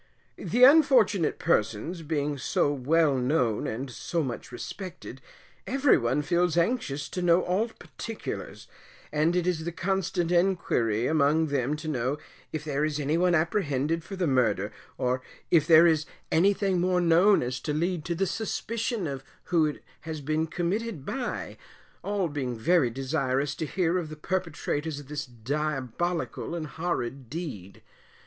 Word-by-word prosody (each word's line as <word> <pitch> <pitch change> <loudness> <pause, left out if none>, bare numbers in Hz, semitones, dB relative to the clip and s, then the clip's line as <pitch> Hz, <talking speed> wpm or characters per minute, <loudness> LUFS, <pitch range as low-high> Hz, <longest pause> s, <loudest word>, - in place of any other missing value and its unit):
The 245 +2 +1
unfortunate 255 - +5
persons 110 - 0
being 150 -2 -1
so 145 +3 +1
well 145 +1 +2
known 125 -4 +1
and 125 +4 -4
so 165 +6 -2
much 125 -3 -5
respected, 140 0 -8 0.5
every 270 +1 +4
one 130 +3 +1
feels 175 +1 +1
anxious 165 - 0
to 180 - -4
know 175 0 +4
all 195 +6 +1
particulars, 225 0 -7 0.4
and 155 +3 +2
it 180 -1 +1
is 175 -3 0
the 170 - -3
constant 175 -1 -1
enquiry 170 - +1
amongst 155 +1 +2
them 140 +2 +1
to 155 +1 -7
know 130 -1 -1 0.3
if 155 -1 -4
there 150 -1 -1
is 155 -1 -1
any 145 +2 0
one 175 +1 +3
apprehended 160 -2 0
for 195 - -7
the 185 -2 0
murder, 110 - +1 0.3
or 125 +1 0 0.3
if 155 -3 +4
there 165 0 +8
is 160 -2 +3 0.2
anything 190 +1 +3
more 180 0 +2
known 175 +3 +5
as 125 +1 -3
to 150 - -3
lead 170 +2 -1
to 170 - -1
the 195 +3 +1
suspicion 215 - -2 0.2
who 165 -3 +2
it 150 - -6 0.2
has 160 0 -6
been 155 +3 -1
committed 180 0 -2
by, 255 -2 -4 0.4
all 200 -3 0
being 135 -6 -3
very 155 +2 +3
desirous 135 +2 -1
to 155 - -4
hear 180 0 +1
of 165 -3 -5
the 155 - -7
perpetrators 160 -3 -2
of 145 -1 -12
this 150 -1 -4
diabolical 150 +7 -3
and 165 -2 -3
horrid 135 -5 -3
deed. 130 - -7
160 Hz, 155 wpm, -27 LUFS, 140-180 Hz, 0.5 s, there